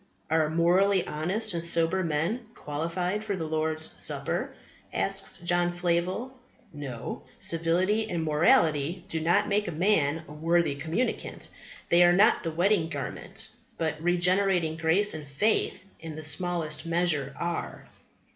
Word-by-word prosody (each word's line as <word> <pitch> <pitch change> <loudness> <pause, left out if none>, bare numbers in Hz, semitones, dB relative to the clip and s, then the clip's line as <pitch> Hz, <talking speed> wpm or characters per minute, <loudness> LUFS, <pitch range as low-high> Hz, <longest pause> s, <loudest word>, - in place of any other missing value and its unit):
"Are 160 -1 +3
morally 180 +4 +3
honest 190 +8 -1
and 170 -1 -2
sober 170 +2 +2
men 170 +9 -1
qualified 170 +7 -3
for 205 -2 -2
the 165 -3 -4
Lord's 155 0 -1
Supper?" - - -1 0.4
asks - - 0
John 175 0 +1
Flavel. 175 +8 -1 0.4
"No; 135 -6 -6 0.2
civility 185 +7 +1
and 170 -2 -2
morality 160 - +2
do 160 - -1
not 175 +6 +2
make 205 0 +1
a - - -2
man 160 -3 +1
a 150 - -10
worthy 165 0 +1
communicant. 160 - -3 0.4
They 175 +1 +6
are 175 0 +6
not 210 +5 +5
the 165 - -3
wedding 175 0 +2
garment; 140 -5 -5 0.3
but 160 -1 -2
regenerating 180 -1 +2
grace 170 +6 +2
and 150 -2 -7
faith 200 +7 0
in 160 -1 -7
the 155 - -7
smallest 160 0 -1
measure 165 -5 0
are." 170 -1 -4
170 Hz, 135 wpm, -27 LUFS, 160-185 Hz, 0.4 s, They